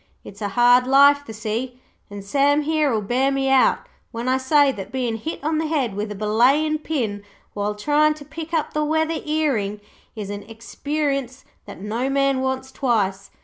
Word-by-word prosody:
It's 200 - -12
a 205 - -1
hard 245 +4 +4
life, 280 +2 +5
the - - -7
sea, 225 +4 -4 0.3
and 200 -1 -9
Sam 285 +6 +2
here'll 295 -8 +1
bear 255 +6 +1
me 270 0 0
out 265 -1 +3 0.2
when 230 +2 -5
I 260 +1 +2
say 285 +1 +4
that 195 -7 -8
bein' 250 -3 -2
hit 300 +6 -6
on 310 +1 0
the 320 - -1
head 275 -9 -1
with 210 +1 -3
a - - -5
belayin' 255 +10 +2
pin 235 -10 -3 0.3
while 205 0 -2
tryin' 300 +7 +2
to 295 -1 -12
pick 315 +2 -8
up 320 -3 -1
the 305 - 0
weather 315 +1 0
earing 270 -10 -1 0.4
is 205 -2 -6
an 205 0 -5
experience 275 +3 -3 0.2
that - - -11
no 230 +6 -2
man 275 -1 +1
wants 265 0 -3
twice. 200 -8 -1
260 Hz, 185 wpm, -22 LUFS, 220-295 Hz, 0.4 s, life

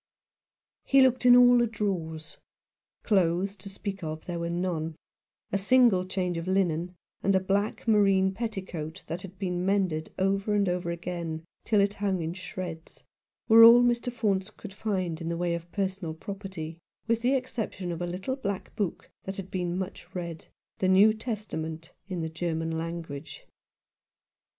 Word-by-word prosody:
He 270 -1 +5
looked 255 -1 +3
in 245 - +9
all 245 0 +7
the 240 - +3
drawers. 165 -8 -4 0.6
Clothes 190 -1 +2
to 200 +1 -9
speak 195 -1 -6
of 155 0 -5
there 175 -1 -4
were 170 0 -2
none 170 -2 -2 0.3
— - - -53
a 200 - +1
single 200 -3 +4
change 180 -2 -1
of 165 - -6
linen, 180 -2 0 0.3
and 195 0 +2
a - - +5
black 200 +4 -1
moreen 195 -3 +4
petticoat 190 -8 -5
that 170 +3 -5
had 190 0 -10
been 180 -2 -2
mended 185 -5 0
over 195 +2 +1
and 200 -1 +2
over 175 -1 -1
again 170 -2 -4 0.2
till 215 -3 +3
it 200 0 +2
hung 200 -3 -1
in 160 +1 -3
shreds, 180 -3 -8 0.4
were 225 0 +9
all 235 +1 +10
Mr. 240 0 +1
Faunce 205 -5 0
could 210 -2 -11
find 185 -6 -2
in 165 - -3
the 170 - -2
way 175 0 0
of 170 0 -5
personal 190 -5 -2
property, 180 -3 -7 0.3
with 230 0 +1
the 255 +3 +3
exception 220 -8 -3
of 170 0 -5
a 175 - -1
little 185 +9 -3
black 200 -8 -4
book 205 -6 -3 0.2
that 190 0 -5
had 190 -1 -7
been 180 -1 -2
much 185 -1 -6
read 170 -3 -5
— - - -66
the 185 - +2
New 200 +3 +6
Testament 180 -8 -5 0.2
in 185 -4 -3
the 160 - -2
German 160 0 -2
language. 165 -3 -6
185 Hz, 170 wpm, -28 LUFS, 170-205 Hz, 0.6 s, all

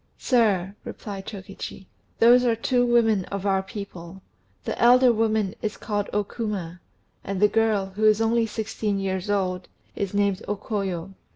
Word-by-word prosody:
"Sir," 200 -7 +2
replied 195 -2 -7
Chokichi, 195 -1 -8 0.3
"those 245 +2 +6
are 235 -2 +2
two 245 +2 +1
women 225 -5 +3
of 200 0 -5
our 195 -1 +2
people. 190 -3 -9 0.4
The - - -3
elder 245 +1 +6
woman 215 -3 +1
is 215 -1 -3
called 205 -2 -3
O 210 - +1
Kuma, 200 -5 -5 0.4
and 195 -1 -3
the 210 - +6
girl, 210 -3 +1
who 215 +1 +1
is 215 0 +5
only 225 0 +2
sixteen 215 -1 -2
years 190 0 -3
old, 185 -3 -1 0.3
is 200 0 -3
named 200 -2 +1
O 205 - -1
Koyo. 195 -3 -4
205 Hz, 160 wpm, -25 LUFS, 195-225 Hz, 0.4 s, those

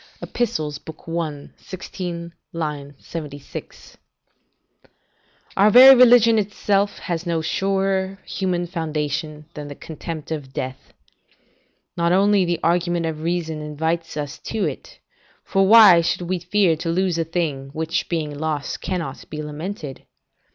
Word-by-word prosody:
Ep., - - -7
i. 160 -5 -3
16, 175 -2 -7 0.2
76.] 145 -1 -7 1.6
Our 205 +2 +5
very 255 +5 +10
religion 240 -3 +6
itself 205 0 0
has 175 -1 -4
no 170 -1 0
surer 195 +2 0
human 180 -2 -1
foundation 155 -3 -3
than 150 -2 -7
the 145 - -8
contempt 160 0 -7
of 140 -4 -6
life. 130 0 -5 1.0
Not 170 -1 +1
only 195 +1 +4
the 175 -1 -1
argument 175 0 +1
of 155 -1 -4
reason 165 -2 -2
invites 160 +2 -3
us 145 -2 -5
to 220 -2 -2
it - - -6 0.5
for 195 -1 +2
why 205 -5 +9
should 170 +1 -1
we 180 +1 -2
fear 180 -1 +2
to 165 +1 -4
lose 175 0 0
a - - +2
thing, 155 -5 -3
which 160 +2 -2
being 155 -4 -2
lost, 150 -1 -3
cannot 170 -7 -4
be 155 0 -5
lamented? 150 -1 -7
170 Hz, 125 wpm, -22 LUFS, 155-190 Hz, 1.6 s, very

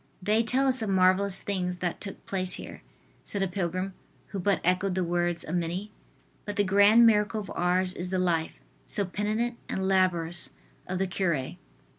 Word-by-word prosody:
"They 210 +4 +2
tell 255 +4 +2
us 260 -2 +2
of 220 - -2
marvelous 190 +1 +3
things 180 -3 -2
that 175 -1 -3
took 195 - -7
place 185 -1 0
here," - - -8 0.4
said 200 -1 0
a - - +1
pilgrim 185 +1 -3 0.4
who 195 - -4
but 195 0 +1
echoed 185 +1 +1
the 185 - +1
words 175 0 0
of 160 - -6
many, 180 +4 -2 0.5
"but 205 - -5
the 205 - +2
grand 205 +4 +6
miracle 215 -1 +3
of 195 - -9
Ars 180 +1 +1
is 180 0 -4
the 190 - -1
life, 170 -3 0 0.3
so 200 - +2
penitent 215 +5 -2
and 190 0 -1
laborious, 175 -3 +1 0.4
of 185 - -2
the 190 - +1
cure." 170 -8 -1
190 Hz, 180 wpm, -28 LUFS, 180-205 Hz, 0.5 s, grand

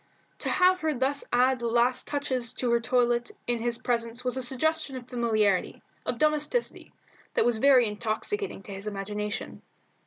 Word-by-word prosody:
To - - -2
have 370 0 +4
her 315 -3 0
thus 270 +3 0
add 255 +1 +3
the 235 - -2
last 240 +2 +1
touches 260 -5 -2
to 245 -2 -1
her 235 - +4
toilet 240 0 +1 0.2
in 240 -1 0
his 235 0 -1
presence 235 0 -2
was 250 - +1
a 260 - -1
suggestion 275 +3 +1
of 250 -1 -8
familiarity, 215 -6 0 0.2
of 240 - -1
domesticity, 305 - 0 0.4
that - - +3
was 240 -2 +1
very 265 -1 +6
intoxicating 220 - -3
to 200 - -8
his 195 +2 -6
imagination. 210 +1 -4
245 Hz, 165 wpm, -27 LUFS, 230-275 Hz, 0.4 s, very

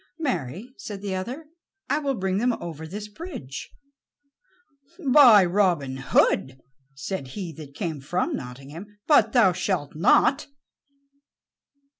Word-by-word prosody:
"Marry," 225 - -3
said 200 -2 -7
the 200 -2 -3
other, 245 +12 -5 0.4
"I - - +1
will 280 -3 -1
bring 190 -2 -1
them 245 +2 +2
over 160 -5 -7
this 205 +5 -7
bridge." 210 - -8 1.4
"By 240 -10 +8
Robin 175 -8 +1
Hood," 130 -1 +1 0.4
said 140 +1 -5
he 180 -5 -5
that 145 -3 -11
came 160 -7 -4
from 175 +7 -1
Nottingham, 145 +11 -9
"but 230 -8 +4
thou 230 -7 +5
shalt 180 -5 -2
not." 255 - +3
190 Hz, 120 wpm, -25 LUFS, 150-225 Hz, 1.4 s, By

